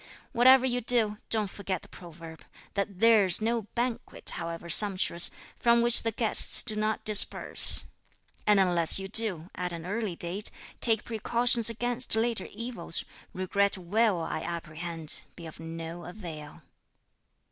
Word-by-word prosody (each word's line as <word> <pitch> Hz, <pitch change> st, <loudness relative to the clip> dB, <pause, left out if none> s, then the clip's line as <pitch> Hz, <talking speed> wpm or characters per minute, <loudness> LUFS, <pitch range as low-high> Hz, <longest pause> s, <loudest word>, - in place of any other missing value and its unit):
Whatever 260 Hz, +2 st, +4 dB
you 245 Hz, -1 st, -2 dB
do, 220 Hz, -3 st, 0 dB
don't 215 Hz, -4 st, -2 dB
forget 190 Hz, -3 st, -6 dB
the -, -, -15 dB
proverb, 165 Hz, -2 st, -13 dB, 0.3 s
that 200 Hz, -2 st, -4 dB
'there's 215 Hz, -6 st, +4 dB
no 225 Hz, -1 st, -3 dB
banquet, 240 Hz, 0 st, -2 dB
however 170 Hz, 0 st, -7 dB
sumptuous, 185 Hz, -1 st, +4 dB, 0.3 s
from 235 Hz, -1 st, +2 dB
which 240 Hz, 0 st, +5 dB
the 225 Hz, -, -3 dB
guests 225 Hz, 0 st, +4 dB
do 220 Hz, -3 st, -2 dB
not 215 Hz, 0 st, -3 dB
disperse;' 215 Hz, -1 st, +3 dB, 0.6 s
and 210 Hz, -1 st, +4 dB
unless 175 Hz, -3 st, +5 dB
you 195 Hz, 0 st, -5 dB
do, 195 Hz, -5 st, +1 dB
at 180 Hz, 0 st, -5 dB
an 165 Hz, -1 st, -8 dB
early 205 Hz, -1 st, -4 dB
date, 180 Hz, +5 st, -1 dB, 0.3 s
take 225 Hz, -2 st, +2 dB
precautions 235 Hz, +1 st, +2 dB
against 240 Hz, +1 st, 0 dB
later 225 Hz, -3 st, -2 dB
evils, 230 Hz, -5 st, -2 dB, 0.3 s
regret 200 Hz, +2 st, -1 dB
will, 195 Hz, +1 st, 0 dB
I -, -, -5 dB
apprehend, 165 Hz, -1 st, -5 dB
be 170 Hz, -, -12 dB
of 160 Hz, -, -12 dB
no 165 Hz, +1 st, -9 dB
avail." 170 Hz, -5 st, -11 dB
205 Hz, 140 wpm, -27 LUFS, 170-230 Hz, 0.6 s, which